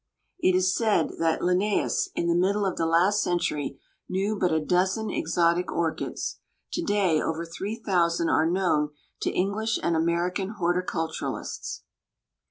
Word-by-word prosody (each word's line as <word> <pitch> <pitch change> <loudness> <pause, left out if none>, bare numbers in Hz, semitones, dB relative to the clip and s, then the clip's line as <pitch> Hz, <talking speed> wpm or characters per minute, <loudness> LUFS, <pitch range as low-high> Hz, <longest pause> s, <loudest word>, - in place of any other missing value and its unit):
It 185 - +3
is 185 0 +3
said 220 -1 +2
that 165 -1 +1
"Linnæus, 205 - +1
in - - 0
the 170 - +2
middle 195 +4 +2
of 190 - -1
the 165 - 0
last 180 +5 +3
century, 150 -6 -1 0.3
knew 195 +3 0
but 180 -3 +1
a 160 - +2
dozen 185 +7 +1
exotic 170 +2 +1
orchids." 165 -1 -2 0.3
To 345 - -1
day 200 - +2
over 165 +1 -2
three 195 +6 -5
thousand 170 -6 +1
are 160 +1 +3
known 170 -5 +1 0.3
to - - +1
English 210 +4 0
and 170 - +1
American 175 +5 0
horticulturists. 170 - -2
180 Hz, 145 wpm, -26 LUFS, 165-195 Hz, 0.3 s, It